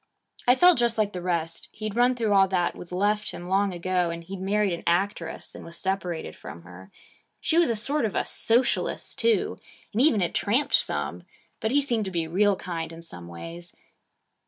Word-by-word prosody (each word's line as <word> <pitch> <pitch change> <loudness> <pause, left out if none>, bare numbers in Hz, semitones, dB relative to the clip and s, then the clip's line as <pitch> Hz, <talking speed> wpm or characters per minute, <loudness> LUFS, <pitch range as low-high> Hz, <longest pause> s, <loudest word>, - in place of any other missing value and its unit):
I 250 - +7
felt 355 +1 +6
just 235 -1 +2
like 210 -1 +1
the 180 - -4
rest. 170 -2 -2
He'd 215 -1 -5
run 245 +1 +4
through 225 -4 +1
all 195 -1 +6
that 180 -2 0
was 175 - -8
left 205 +3 +1
him 175 - -6
long 195 +2 +2
ago; 180 0 0
and 170 0 -5
he'd 185 +2 -7
married 200 0 +1
an 170 - -4
actress 175 -1 -1
and - - -9
was 170 0 -9
separated 180 - -3
from 85 - -10
her. 90 +2 -13 0.5
He 330 - +2
was 345 - +4
a 230 - +1
sort 265 +5 0
of 210 - -3
a - - +1
Socialist 240 +3 0
too, 460 -1 +1 0.3
and 220 - +2
even 265 -7 +4
had 175 - 0
tramped 240 +8 +1
some. - - +1 0.4
But 220 - -1
he 285 +4 +3
seemed 235 -6 0
to - - -3
be 165 -2 -1
real 200 +4 +3
kind 170 -3 -5
in 165 0 -10
some 90 - -10
ways. 165 - -9
195 Hz, 205 wpm, -26 LUFS, 170-220 Hz, 0.5 s, I